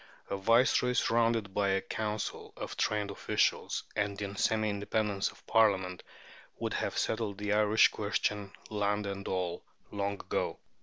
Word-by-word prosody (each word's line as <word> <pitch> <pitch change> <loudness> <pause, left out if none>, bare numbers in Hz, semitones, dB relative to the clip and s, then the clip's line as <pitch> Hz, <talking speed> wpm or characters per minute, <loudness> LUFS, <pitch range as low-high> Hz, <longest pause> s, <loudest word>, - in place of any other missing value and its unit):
A - - +1
Viceroy 120 +5 +3
surrounded 115 -4 +2
by 100 0 +1
a 95 0 +2
Council 105 +1 -4
of - - -5
trained 105 -2 0
officials, - - 0
and 100 -1 -1
in 100 -1 -4
semi 110 +1 +2
independence 100 0 0
of - - -17
Parliament, 95 -5 +3 0.6
would - - -2
have - - -2
settled 110 -3 -1
the 105 +1 -1
Irish 105 +1 +5
question, 105 -1 -1 0.2
land 105 0 0
and 100 0 -4
all, 90 -2 -2 0.3
long 100 0 -1
ago. 100 - -2
105 Hz, 145 wpm, -31 LUFS, 100-110 Hz, 0.6 s, Irish